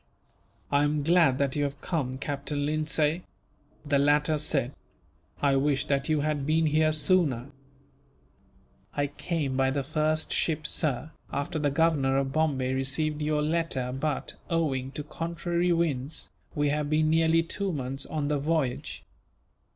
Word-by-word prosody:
"I 145 0 +4
am 145 0 +1
glad 165 -5 +4
that 140 -1 0
you 145 - +1
have 140 0 -3
come, 130 -7 -2
Captain 145 +1 -3
Lindsay," 155 +2 +1 0.6
the 145 -1 +2
latter 150 +2 +3
said. 140 -3 0 0.7
"I 140 -1 +4
wish 140 0 +1
that 140 0 0
you 155 -2 +2
had 150 -1 -1
been 160 +3 +2
here 155 +1 +3
sooner." 150 -5 +2 1.4
"I 145 - +1
came 145 -1 -3
by 135 0 +2
the 140 +1 -1
first 155 +3 0
ship, 155 -2 +1
sir, 150 0 0 0.2
after 155 +3 -2
the 145 -1 +1
Governor 140 -3 +2
of 135 -1 -1
Bombay 140 -5 +1
received 150 +3 -1
your 150 0 +1
letter 155 -5 0
but, 145 +4 -2 0.2
owing 145 -6 0
to 150 - -4
contrary 170 +3 -1
winds, 160 -4 -1 0.2
we 145 -1 +1
have 150 0 -1
been 155 0 +2
nearly 165 0 +4
two 195 +3 -2
months 135 -2 -3
on 150 -2 -2
the 145 -1 0
voyage. 145 -4 -1
150 Hz, 150 wpm, -28 LUFS, 140-155 Hz, 1.4 s, I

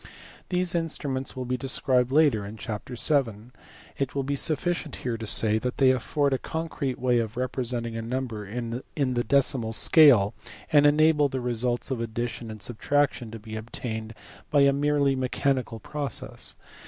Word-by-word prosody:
These 180 -1 +1
instruments 145 -6 -2
will 130 -1 -4
be 125 +1 -1
described 130 -1 +2
later 140 -8 +3
in 105 +2 -8
chapter 110 +3 -6
vn.; 120 -5 0 0.5
it 140 -1 -2
will 140 - 0
be 140 +1 -2
sufficient 160 +2 -1
here 120 -2 0
to 110 -1 -6
say 110 +1 +3
that 125 +2 -3
they 130 -2 +5
afford 140 +2 0
a 130 - 0
concrete 160 -5 -4
way 125 -1 +2
of 115 +1 -4
representing 125 -2 -3
a 115 - -3
number 115 -2 -4
in 115 +4 -5
the 130 -4 0
decimal 125 -3 +1
scale, 120 -7 +6 0.4
and 145 -1 +7
enable 150 -1 +4
the 130 -1 -3
results 120 +1 -2
of 125 -3 -2
addition 115 0 -4
and 110 -2 -8
subtraction 125 +1 0
to 115 - -8
be 110 0 -9
obtained 110 0 -6 0.3
by 145 -2 +4
a 140 0 +5
merely 140 -1 +2
mechanical 130 -2 -1
process. 145 +5 -3
125 Hz, 165 wpm, -26 LUFS, 115-140 Hz, 0.5 s, and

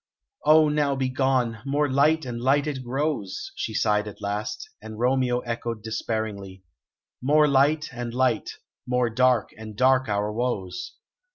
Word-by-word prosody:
"Oh, 155 0 +7
now 150 -2 +1
be 130 -1 -1
gone; 130 -3 0
more 145 +2 +1
light 145 +3 +2
and 120 -2 -5
light 140 +3 +3
it 140 -4 -4
grows," 130 -6 -3
she 110 - -4
sighed 105 -1 +1
at 105 - -9
last; 105 - -4
and 110 -1 -9
Romeo 125 0 +1
echoed 115 -2 -4
despairingly: 110 -4 -4 0.6
"More 150 +3 +4
light 145 +3 +2
and 120 -1 -5
light; 125 -2 +1 0.4
more 125 -1 +1
dark 125 -1 +2
and 110 -1 -9
dark 130 -1 +3
our 105 +1 -1
woes!" 100 -7 -3
125 Hz, 150 wpm, -25 LUFS, 110-140 Hz, 0.6 s, Oh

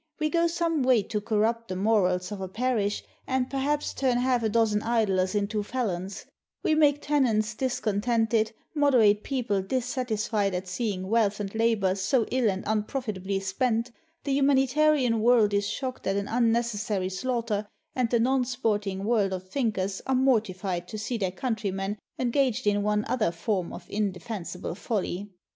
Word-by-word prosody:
We 305 -1 0
go 340 0 +3
some 335 -2 0
way 250 -4 +4
to 210 +1 -3
corrupt 225 +2 0
the 185 - -4
morals 185 -2 +1
of 200 -2 -5
a 190 - -3
parish, 215 0 -1 0.2
and 260 -1 0
perhaps 285 +2 -1
turn 255 -3 +1
half 250 -1 +2
a 220 - +1
dozen 215 -2 +2
idlers 210 -5 +1
into 210 +1 0
felons; 200 -5 -3 0.4
we - - +2
make 290 -2 +3
tenants 230 -7 +2
dis 255 +3 -2
contented, 225 +1 +1 0.2
moderate 245 -9 +4
people 235 -8 -1
dissatisfied 220 -3 -1
at 185 +1 -4
seeing 190 -1 -2
wealth 215 -1 +2
and 200 -1 -4
labor 220 -4 +2
so 200 +5 +1
ill 250 -3 +2
and 190 -1 -2
unprofitably 210 -3 -2
spent, 230 +5 0 0.3
the 275 -2 0
humanita 275 +2 +3
rian 250 -7 +2
world 225 -2 +4
is 200 0 +1
shocked 255 +4 -4
at 195 - +1
an 200 0 -1
unnecessary 225 -5 0
slaughter, 220 0 -2 0.3
and 250 -3 +1
the 235 - +2
non 255 +2 +2
sporting 210 -6 -1
world 210 -3 +2
of 185 0 -5
thinkers 200 -5 -1
are 265 - +2
mortified 195 -8 +1
to 215 - -6
see 225 +2 -3
their 190 -3 0
countrymen 205 -3 -2 0.2
engaged 255 -1 +1
in 205 0 +2
one 210 0 +1
other 220 -8 +1
form 175 +2 -2
of 175 - -9
inde 200 -3 -1
fensible 185 -6 -5
folly. 205 -2 -3
220 Hz, 165 wpm, -27 LUFS, 200-250 Hz, 0.4 s, way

